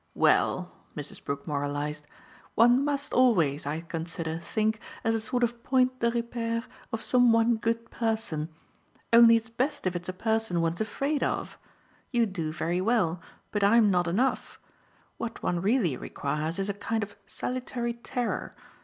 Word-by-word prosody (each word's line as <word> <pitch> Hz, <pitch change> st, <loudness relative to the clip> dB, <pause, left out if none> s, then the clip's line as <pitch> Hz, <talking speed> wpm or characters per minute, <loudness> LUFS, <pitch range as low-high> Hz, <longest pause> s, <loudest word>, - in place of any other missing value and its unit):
"Well," -, -, +2 dB, 0.3 s
Mrs. -, -, -7 dB
Brook 140 Hz, 0 st, -4 dB
moralised, 145 Hz, 0 st, -3 dB, 0.5 s
"one 245 Hz, +4 st, +5 dB
must 285 Hz, -1 st, -1 dB
always, 170 Hz, -, +3 dB
I 155 Hz, +3 st, -2 dB
consider, 165 Hz, -1 st, -4 dB
think, 215 Hz, +4 st, -1 dB, 0.2 s
as 225 Hz, -, +2 dB
a 225 Hz, -, +1 dB
sort 245 Hz, +3 st, -1 dB
of 240 Hz, 0 st, -1 dB
point 255 Hz, -1 st, +2 dB
de 235 Hz, -, +2 dB
repere, 235 Hz, -1 st, -2 dB, 0.3 s
of 225 Hz, -, -3 dB
some 245 Hz, -2 st, +5 dB
one 230 Hz, 0 st, +4 dB
good 230 Hz, +1 st, -2 dB
person. 220 Hz, -9 st, -2 dB, 0.6 s
Only 230 Hz, 0 st, +9 dB
it's 225 Hz, 0 st, -2 dB
best 270 Hz, +4 st, -1 dB
if 185 Hz, -1 st, 0 dB
it's 175 Hz, +1 st, -4 dB
a -, -, -2 dB
person 220 Hz, -2 st, 0 dB
one's 165 Hz, +3 st, 0 dB
afraid 275 Hz, +7 st, -1 dB
of. -, -, -2 dB, 0.5 s
You 240 Hz, -2 st, +2 dB
do 170 Hz, -7 st, -3 dB
very 170 Hz, +2 st, -1 dB
well, 185 Hz, -6 st, +1 dB, 0.3 s
but 205 Hz, -1 st, 0 dB
I'm 210 Hz, 0 st, +5 dB
not 175 Hz, -1 st, +2 dB
enough. 235 Hz, +10 st, 0 dB, 0.6 s
What 230 Hz, -, -5 dB
one 175 Hz, -1 st, 0 dB
really 200 Hz, -, +2 dB
requires 150 Hz, +6 st, -3 dB
is 195 Hz, 0 st, -1 dB
a 200 Hz, -, -1 dB
kind 220 Hz, +2 st, -2 dB
of 205 Hz, 0 st, -8 dB
salutary 250 Hz, -1 st, -3 dB
terror. 240 Hz, +1 st, -3 dB
220 Hz, 160 wpm, -28 LUFS, 170-235 Hz, 0.6 s, Only